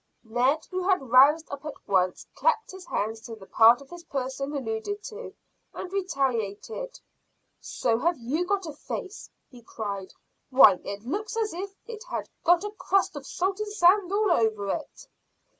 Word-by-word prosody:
Ned, 250 +6 +1
who 370 0 -2
had 275 -11 +1
roused 290 +6 +6
up 280 0 -6
at 300 -1 -6
once, 185 -2 +1
clapped 485 -2 +1
his 375 -1 -11
hands 220 +2 -2
to 230 0 -8
the 200 -3 -14
part 230 +5 +6
of 275 - -15
his 350 -1 -10
person 270 +1 -3
alluded 275 - -3
to, 455 +2 -8 0.4
and 370 - -7
retaliated. 275 - -2 0.6
"So 230 -2 -1
have 340 +4 +1
you 285 +9 -2
got 395 -1 0
a 310 - -6
face," 380 +6 -7 0.2
he 245 -2 -14
cried. 200 -4 -6 0.4
"Why, 255 -8 +7
it 200 +1 -6
looks 425 - -4
as 435 -4 0
if 390 +3 -6
it 450 -1 -8
had - - -3 0.2
got 350 +2 +4
a 415 - -4
crust 390 -3 0
of 280 -2 -7
salt 380 +2 -1
and 425 -1 -3
sand 375 -1 +4
all 410 -1 +2
over 220 -8 +1
it." - - -5
290 Hz, 175 wpm, -27 LUFS, 230-390 Hz, 0.6 s, Why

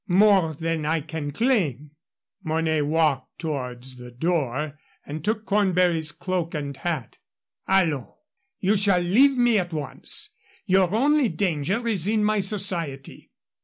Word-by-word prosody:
More 190 -4 +4
than 165 +1 -2
I 160 +1 0
can 155 -1 -5
claim." 150 - 0 0.5
Mornay 160 -1 0
walked 150 -2 0
towards 130 -5 -5
the 125 0 -10
door 150 +1 -2 0.3
and 150 +1 -7
took 215 +2 -1
Cornbury's 180 -6 +2
cloak 180 0 -3
and 140 -2 -4
hat. 155 -7 -4 0.5
"Allons! 165 -9 +1 0.5
You 200 +3 +2
shall 195 -2 +4
leave 255 +10 +4
me 240 -3 +4
at 175 -1 -4
once. 150 -3 -1 0.3
Your 185 -1 +3
only 285 +1 +3
danger 185 +5 -1
is 195 -6 +2
in 215 0 +1
my 215 0 +2
society. 180 -9 0
165 Hz, 130 wpm, -24 LUFS, 150-200 Hz, 0.5 s, More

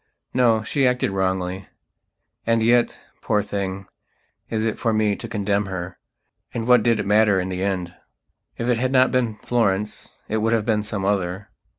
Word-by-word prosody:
No, 115 -3 +3
she 135 +4 +1
acted 125 -5 +1
wrongly.... 95 -1 -2 0.8
And 115 -1 +3
yet, 120 +1 +3 0.2
poor 105 -1 +1
thing, 100 -2 -4 0.6
is 110 -1 -1
it 110 - -2
for 115 -1 +1
me 105 -1 +2
to 115 - -8
condemn 100 -2 0
herand 95 +5 -8
what 125 -1 +6
did 115 +1 +2
it - - -2
matter 105 -1 +4
in 90 0 -2
the 90 0 -3
end? 90 -3 -2 0.6
If 115 - -3
it 125 -2 +2
had 130 +2 0
not 130 -1 +4
been 120 -4 0
Florence, 105 -4 -1 0.2
it 110 - -1
would 110 +1 +1
have 110 -2 +1
been 110 -2 +1
some 105 -2 -4
other... 95 0 -1
105 Hz, 175 wpm, -22 LUFS, 95-115 Hz, 0.8 s, what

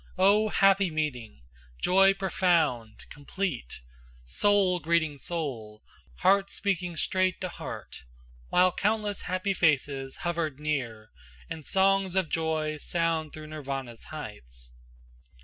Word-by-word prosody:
O 205 +3 +4
happy 195 -2 +4
meeting! 125 - -4 0.4
joy 195 - +5
profound, 165 - 0
complete! 145 - -4 0.4
Soul 190 - +2
greeting 160 -3 0
soul, 125 -12 -5 0.4
heart 195 +1 +4
speaking 180 -3 -2
straight 185 +2 +1
to 185 - -2
heart, 60 - -8 0.4
While 180 0 +4
countless 210 +1 0
happy 185 +2 -1
faces 140 -5 +1
hovered 165 -5 -1
near 120 -8 -3 0.4
And 160 - -5
song's 195 -1 +2
of 190 -4 +1
joy 160 -1 -1
sound 165 -1 -1
through 155 0 -9
Nirvana's 135 -6 -6
heights. - - -8
160 Hz, 110 wpm, -28 LUFS, 135-190 Hz, 0.4 s, joy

